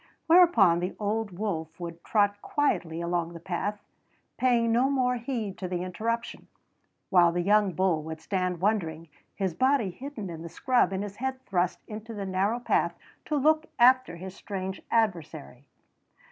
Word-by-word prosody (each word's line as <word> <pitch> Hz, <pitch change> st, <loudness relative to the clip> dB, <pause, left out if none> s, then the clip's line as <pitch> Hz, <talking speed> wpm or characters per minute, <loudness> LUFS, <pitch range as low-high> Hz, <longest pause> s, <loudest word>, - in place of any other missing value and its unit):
Whereupon 320 Hz, -, +6 dB
the 180 Hz, +2 st, -3 dB
old 215 Hz, +1 st, -1 dB
wolf 165 Hz, -6 st, -3 dB
would 170 Hz, -1 st, -7 dB
trot 205 Hz, -1 st, +1 dB
quietly 170 Hz, -, -1 dB
along 170 Hz, 0 st, -1 dB
the 170 Hz, -, -8 dB
path, 190 Hz, +4 st, -3 dB, 0.5 s
paying 240 Hz, -2 st, +2 dB
no 245 Hz, +4 st, +3 dB
more 250 Hz, -2 st, +1 dB
heed 230 Hz, -5 st, -4 dB
to 185 Hz, -, -3 dB
the 180 Hz, 0 st, -3 dB
interruption; 230 Hz, +6 st, -3 dB, 0.6 s
while 175 Hz, -3 st, +6 dB
the 175 Hz, +1 st, -1 dB
young 205 Hz, 0 st, +3 dB
bull 180 Hz, -2 st, +1 dB
would 160 Hz, 0 st, -6 dB
stand 180 Hz, -1 st, -2 dB
wondering, 165 Hz, -6 st, -1 dB, 0.3 s
his 190 Hz, -3 st, -1 dB
body 260 Hz, -2 st, +2 dB
hidden 245 Hz, 0 st, -7 dB
in 160 Hz, -1 st, -7 dB
the 170 Hz, -, -7 dB
scrub 245 Hz, +6 st, +2 dB
and 190 Hz, +1 st, -2 dB
his 205 Hz, 0 st, -7 dB
head 265 Hz, +1 st, -3 dB
thrust 180 Hz, -2 st, -1 dB
into 220 Hz, +1 st, -7 dB
the 200 Hz, -1 st, -4 dB
narrow 195 Hz, +5 st, 0 dB
path 245 Hz, -, +1 dB, 0.3 s
to 305 Hz, -, -1 dB
look 310 Hz, +3 st, +3 dB
after 255 Hz, -5 st, +5 dB
his 185 Hz, +2 st, -8 dB
strange 190 Hz, -1 st, -5 dB
adversary. 165 Hz, -, -1 dB
200 Hz, 160 wpm, -28 LUFS, 175-235 Hz, 0.6 s, Whereupon